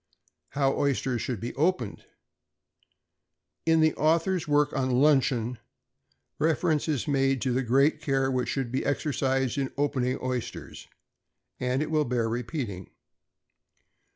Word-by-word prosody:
=How 135 Hz, -1 st, +1 dB
Oysters 135 Hz, -3 st, 0 dB
should 125 Hz, -5 st, -3 dB
be 120 Hz, +4 st, -5 dB
opened.= 150 Hz, -, -1 dB, 1.6 s
In 160 Hz, 0 st, +4 dB
the 155 Hz, -1 st, +4 dB
author's 165 Hz, +2 st, +1 dB
work 145 Hz, 0 st, +2 dB
on 130 Hz, -1 st, 0 dB
"Luncheon," 125 Hz, -3 st, +2 dB, 0.8 s
reference 160 Hz, -1 st, +1 dB
is 145 Hz, -6 st, -1 dB
made 135 Hz, -2 st, +2 dB
to 130 Hz, -, 0 dB
the 130 Hz, -, +1 dB
great 135 Hz, +5 st, +2 dB
care 135 Hz, -2 st, +1 dB
which 125 Hz, -1 st, -1 dB
should 135 Hz, -4 st, -2 dB
be 130 Hz, -, -1 dB
exercised 135 Hz, -2 st, 0 dB
in 135 Hz, -1 st, -2 dB
opening 130 Hz, -3 st, 0 dB
oysters; 125 Hz, -2 st, -5 dB, 0.7 s
and 130 Hz, +3 st, 0 dB
it 155 Hz, -, -5 dB
will 155 Hz, -1 st, +2 dB
bear 120 Hz, -2 st, 0 dB
repeating. 115 Hz, -, -4 dB
135 Hz, 125 wpm, -27 LUFS, 125-150 Hz, 1.6 s, In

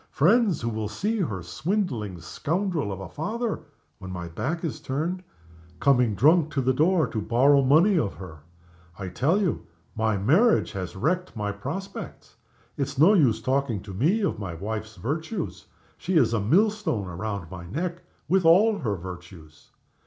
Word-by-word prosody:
Friends 200 Hz, -, +3 dB
who 115 Hz, -, -1 dB
will 110 Hz, -2 st, -3 dB
see 210 Hz, -, -2 dB
her 105 Hz, -, -2 dB
swindling 120 Hz, -, -2 dB
scoundrel 160 Hz, -, -2 dB
of 95 Hz, -, -5 dB
a 95 Hz, -, -6 dB
father 215 Hz, -, -3 dB, 0.4 s
(when 95 Hz, -2 st, -8 dB
my 90 Hz, -2 st, -5 dB
back 160 Hz, -, -3 dB
is 160 Hz, -, -3 dB
turned) 165 Hz, +7 st, -3 dB, 0.6 s
coming 125 Hz, -6 st, +3 dB
drunk 155 Hz, -, +4 dB
to 140 Hz, -, 0 dB
the 130 Hz, +1 st, +2 dB
door 160 Hz, +4 st, +3 dB
to 115 Hz, -2 st, -3 dB
borrow 135 Hz, +6 st, +4 dB
money 165 Hz, +8 st, +4 dB
of 100 Hz, -, -2 dB
her! 85 Hz, -5 st, -10 dB, 0.6 s
I 95 Hz, -2 st, -5 dB
tell 150 Hz, -, +1 dB
you, 190 Hz, -6 st, -1 dB, 0.3 s
my 110 Hz, -2 st, +1 dB
marriage 165 Hz, -, +3 dB
has 90 Hz, -2 st, -5 dB
wrecked 175 Hz, -, -1 dB
my 105 Hz, -2 st, -2 dB
prospects. 190 Hz, -, -7 dB, 0.4 s
It's 140 Hz, -1 st, -3 dB
no 165 Hz, +9 st, +6 dB
use 140 Hz, -, +3 dB
talking 130 Hz, -5 st, 0 dB
to 100 Hz, -, -8 dB
me 160 Hz, -, +2 dB
of 195 Hz, -, -1 dB
my 95 Hz, -5 st, -5 dB
wife's 110 Hz, +4 st, -5 dB
virtues. 160 Hz, -, -4 dB, 0.3 s
She 185 Hz, +2 st, -2 dB
is 120 Hz, -6 st, +3 dB
a 115 Hz, -, +1 dB
millstone 180 Hz, -, +1 dB
round 95 Hz, 0 st, -5 dB
my 85 Hz, -2 st, -8 dB
neck, 170 Hz, -, -3 dB, 0.3 s
with 185 Hz, +3 st, +3 dB
all 200 Hz, +6 st, +5 dB
her 110 Hz, -8 st, -1 dB
virtues. 90 Hz, -4 st, -11 dB
135 Hz, 165 wpm, -25 LUFS, -, 0.6 s, no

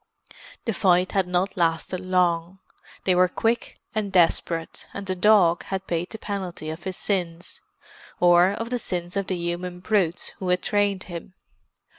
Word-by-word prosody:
The 230 Hz, -, 0 dB
fight 185 Hz, -3 st, +3 dB
had 195 Hz, -3 st, +1 dB
not 180 Hz, +2 st, 0 dB
lasted 170 Hz, +1 st, 0 dB
long; 180 Hz, -1 st, +1 dB, 0.5 s
they 185 Hz, -, +3 dB
were 180 Hz, +1 st, +5 dB
quick 225 Hz, +6 st, -1 dB, 0.2 s
and 215 Hz, -2 st, -2 dB
desperate, 165 Hz, -2 st, +1 dB
and 200 Hz, -, -5 dB
the 190 Hz, -, -1 dB
dog 185 Hz, -3 st, +4 dB
had 190 Hz, 0 st, -4 dB
paid 175 Hz, 0 st, -2 dB
the 220 Hz, -, -7 dB
penalty 185 Hz, -7 st, -5 dB
of 160 Hz, +3 st, -9 dB
his 190 Hz, -1 st, -4 dB
sins—or 175 Hz, -1 st, 0 dB
of 230 Hz, +4 st, -4 dB
the 245 Hz, -, 0 dB
sins 175 Hz, -3 st, -4 dB
of 200 Hz, -1 st, -1 dB
the 185 Hz, -, -1 dB
human 175 Hz, +1 st, -3 dB
brutes 180 Hz, -3 st, 0 dB
who 185 Hz, -, -3 dB
had 180 Hz, 0 st, +2 dB
trained 205 Hz, -2 st, +1 dB
him. 175 Hz, +1 st, -8 dB
180 Hz, 160 wpm, -25 LUFS, 175-195 Hz, 0.5 s, were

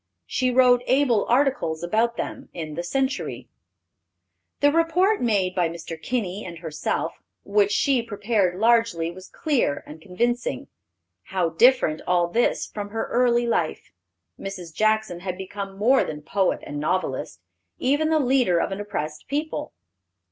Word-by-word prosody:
She 255 Hz, -, 0 dB
wrote 250 Hz, -1 st, +5 dB
able 255 Hz, -5 st, +3 dB
articles 245 Hz, -, +1 dB
about 225 Hz, +6 st, +1 dB
them -, -, -5 dB
in 155 Hz, -3 st, -5 dB
the 170 Hz, -, -3 dB
Century. 265 Hz, +9 st, -2 dB, 1.1 s
The 290 Hz, 0 st, +4 dB
report 340 Hz, +6 st, +2 dB
made 200 Hz, -6 st, +1 dB
by 175 Hz, -3 st, +1 dB
Mr. 165 Hz, 0 st, -7 dB
Kinney 210 Hz, -4 st, -2 dB
and 170 Hz, -2 st, -8 dB
herself, 160 Hz, -2 st, -3 dB, 0.2 s
which 205 Hz, 0 st, +2 dB
she 265 Hz, +2 st, +2 dB
prepared 205 Hz, -4 st, 0 dB
largely, 225 Hz, -8 st, +3 dB
was 185 Hz, +2 st, -11 dB
clear 265 Hz, -, 0 dB
and 155 Hz, +1 st, -11 dB
convincing. 240 Hz, +8 st, -2 dB, 0.6 s
How 180 Hz, -3 st, 0 dB
different 165 Hz, -3 st, +4 dB
all 175 Hz, -1 st, +3 dB
this 235 Hz, +8 st, +1 dB
from 205 Hz, -1 st, -6 dB
her 225 Hz, +2 st, -3 dB
early 240 Hz, -1 st, +3 dB
life! 175 Hz, -9 st, -1 dB, 0.5 s
Mrs. 185 Hz, -4 st, -7 dB
Jackson 215 Hz, -3 st, +1 dB
had 185 Hz, 0 st, -4 dB
become 195 Hz, +1 st, -6 dB
more 250 Hz, +6 st, +4 dB
than 150 Hz, -1 st, -6 dB
poet 190 Hz, +4 st, 0 dB
and 145 Hz, 0 st, -5 dB
novelist; 180 Hz, +5 st, -2 dB, 0.4 s
even 290 Hz, +4 st, +1 dB
the 320 Hz, -, +3 dB
leader 250 Hz, -, +3 dB
of -, -, -1 dB
an 195 Hz, +1 st, -3 dB
oppressed 155 Hz, -7 st, -5 dB
people. 300 Hz, +3 st, -3 dB
205 Hz, 145 wpm, -24 LUFS, 175-250 Hz, 1.1 s, wrote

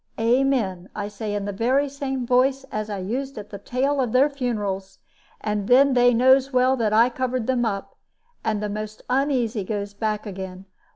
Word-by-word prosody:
'Amen,' 230 Hz, -6 st, +1 dB
I 205 Hz, -1 st, -3 dB
say, 205 Hz, 0 st, -4 dB
in 205 Hz, -1 st, -2 dB
the 205 Hz, -, -2 dB
very 255 Hz, +8 st, +1 dB
same 270 Hz, -2 st, -4 dB
voice 260 Hz, +2 st, +2 dB
as 215 Hz, 0 st, -3 dB
I 205 Hz, -, -3 dB
used 250 Hz, +8 st, -4 dB
at 210 Hz, 0 st, -8 dB
the 200 Hz, -, -7 dB
tail 270 Hz, +6 st, 0 dB
of 245 Hz, -4 st, -2 dB
their 275 Hz, +3 st, +4 dB
funerals; 205 Hz, -8 st, -3 dB, 0.4 s
and 210 Hz, -2 st, -2 dB
then 270 Hz, +2 st, +5 dB
they 245 Hz, 0 st, +5 dB
knows 260 Hz, +3 st, +4 dB
well 255 Hz, 0 st, +3 dB
that 220 Hz, -3 st, +1 dB
I 225 Hz, +3 st, +5 dB
covered 255 Hz, -1 st, -2 dB
them 250 Hz, -1 st, +1 dB
up, 200 Hz, -3 st, -3 dB, 0.5 s
and 215 Hz, -1 st, -1 dB
the -, -, 0 dB
most 215 Hz, +1 st, -6 dB
uneasy 255 Hz, -5 st, +1 dB
goes 200 Hz, 0 st, -4 dB
back 215 Hz, +1 st, -2 dB
again. 190 Hz, -1 st, -7 dB
230 Hz, 185 wpm, -23 LUFS, 205-260 Hz, 0.5 s, then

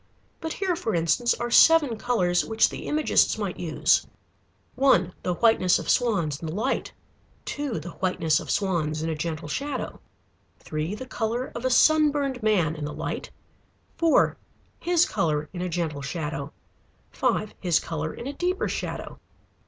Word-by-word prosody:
But 320 Hz, -1 st, -4 dB
here 380 Hz, -3 st, -1 dB
for 225 Hz, -, -2 dB
instance 170 Hz, +9 st, +2 dB
are 240 Hz, 0 st, -4 dB
seven 305 Hz, -4 st, +6 dB
colors 200 Hz, -7 st, +1 dB
which 220 Hz, 0 st, +2 dB
the -, -, -7 dB
Imagists 305 Hz, 0 st, +2 dB
might -, -, -4 dB
use: -, -, +2 dB, 0.7 s
(1) 190 Hz, -10 st, +3 dB
The 180 Hz, -, -1 dB
whiteness 205 Hz, -4 st, +4 dB
of -, -, -1 dB
swans 190 Hz, -, +1 dB
in 165 Hz, -, -4 dB
the 155 Hz, -, -4 dB
light. 235 Hz, +6 st, -1 dB, 0.5 s
(2) 285 Hz, -, -3 dB
The 170 Hz, +3 st, -8 dB
whiteness 170 Hz, -4 st, 0 dB
of -, -, -9 dB
swans 160 Hz, -6 st, 0 dB
in 165 Hz, -, -1 dB
a -, -, -2 dB
gentle 155 Hz, -1 st, -4 dB
shadow. 275 Hz, -, -4 dB, 0.6 s
(3) 155 Hz, +5 st, -4 dB
The 260 Hz, -, -7 dB
color 240 Hz, +1 st, -3 dB
of 235 Hz, -, -5 dB
a -, -, +3 dB
sunburned 290 Hz, -2 st, +3 dB
man 185 Hz, -8 st, +2 dB
in 150 Hz, -, -6 dB
the 150 Hz, -, -5 dB
light. -, -, -4 dB, 0.7 s
(4) 330 Hz, -1 st, +3 dB, 0.4 s
His 345 Hz, -1 st, +3 dB
color 150 Hz, -2 st, -1 dB
in 180 Hz, -, -5 dB
a 180 Hz, -, -2 dB
gentle 160 Hz, -4 st, -2 dB
shadow. 150 Hz, 0 st, -4 dB, 0.6 s
(5) 215 Hz, -, 0 dB
His 175 Hz, -4 st, +2 dB
color 160 Hz, -1 st, -4 dB
in -, -, -9 dB
a 280 Hz, -, -4 dB
deeper 360 Hz, +5 st, -1 dB
shadow. -, -, -5 dB
200 Hz, 160 wpm, -25 LUFS, 160-260 Hz, 0.7 s, seven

